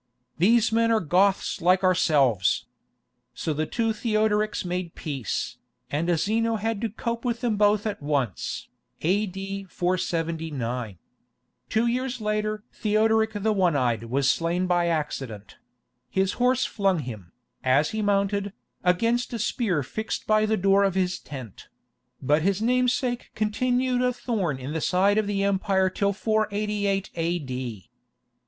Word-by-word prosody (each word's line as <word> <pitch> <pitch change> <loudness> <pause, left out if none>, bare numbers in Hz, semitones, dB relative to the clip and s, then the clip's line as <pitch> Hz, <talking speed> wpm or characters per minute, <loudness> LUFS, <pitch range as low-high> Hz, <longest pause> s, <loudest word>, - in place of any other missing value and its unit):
These 225 +5 +4
men 230 0 +3
are 225 - +4
Goths 190 +3 +1
like 180 +3 +3
ourselves." 145 - +3 0.7
So 155 - -2
the 155 +1 -2
two 225 -1 0
Theodorics 215 -2 0
made 180 -1 -3
peace, 135 -8 -3 0.3
and 160 +4 0
Zeno 225 +5 +1
had 220 0 -2
to 230 - -1
cope 230 +2 -4
with 240 -2 -2
them 235 -4 +1
both 205 0 +3
at 210 -5 -3
once 140 - -2 0.3
[A.D. 195 +2 -1
479]. 160 - -2 0.7
Two 220 +2 +2
years 250 +1 -1
later 215 0 -1
Theodoric 220 +1 +2
the 215 +1 0
One 180 -6 +2
Eyed 120 -4 0
was 135 +3 0
slain 170 +5 +1
by 175 -1 +2
accident—his 150 - -4
horse 255 0 +3
flung 195 -4 +1
him, 105 -9 -8 0.3
as 135 +4 +3
he 220 - -2
mounted, 200 0 0 0.3
against 230 +8 +1
a - - -1
spear 200 - 0
fixed 220 +11 -4
by 215 0 +3
the 220 0 +1
door 195 +1 +4
of 195 -2 +1
his 185 -1 0
tent—but 135 +3 -5
his 195 +3 +1
namesake 250 +1 +1
continued 250 +4 +1
a 250 0 +2
thorn 210 - -2
in 130 +3 -6
the 160 - -2
side 195 +5 +3
of 215 - -1
the 200 -1 0
empire 195 -1 +2
till 200 +1 +1
488 210 -1 -1
A.D. 130 - -3
195 Hz, 135 wpm, -25 LUFS, 160-220 Hz, 0.7 s, These